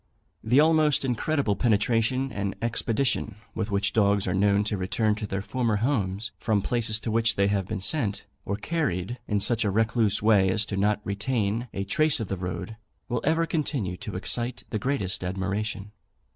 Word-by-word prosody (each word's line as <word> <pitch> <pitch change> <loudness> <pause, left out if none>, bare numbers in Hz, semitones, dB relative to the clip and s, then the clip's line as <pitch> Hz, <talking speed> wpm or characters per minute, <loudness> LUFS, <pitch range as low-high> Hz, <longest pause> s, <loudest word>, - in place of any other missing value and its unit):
The 120 +5 +4
almost 155 -2 +4
incredible 130 -2 0
penetration 115 +4 +1
and 100 -1 -3
expedition 115 -1 -1 0.2
with 110 -1 -3
which 100 0 0
dogs 100 -2 +2
are 90 - 0
known 100 +1 +3
to 105 0 -1
return 105 +3 0
to 105 0 -4
their 100 0 -3
former 120 -1 0
homes, 105 -3 -1
from 105 -3 +1
places 115 -3 0
to 115 - -3
which 115 0 +2
they 100 - +3
have 100 -2 0
been 105 -3 -4
sent, 105 -4 -1 0.2
or 100 - -2
carried 120 - -2
in 105 -2 +1
such 115 +3 +1
a 105 - +1
recluse 110 0 +2
way 105 -3 +4
as 105 +3 +1
not 105 +1 +1
to - - -11
retain 110 +2 -1
a 100 - -3
trace 155 +8 +2
of 110 - -4
the 95 - -1
road, 90 +5 -5 0.3
will 120 -1 -1
ever 165 +2 +2
continue 140 - -1
to 105 - -6
excite 120 +6 0
the 110 - -1
greatest 105 -7 -2
admiration. 100 +2 -3
110 Hz, 180 wpm, -26 LUFS, 100-120 Hz, 0.3 s, The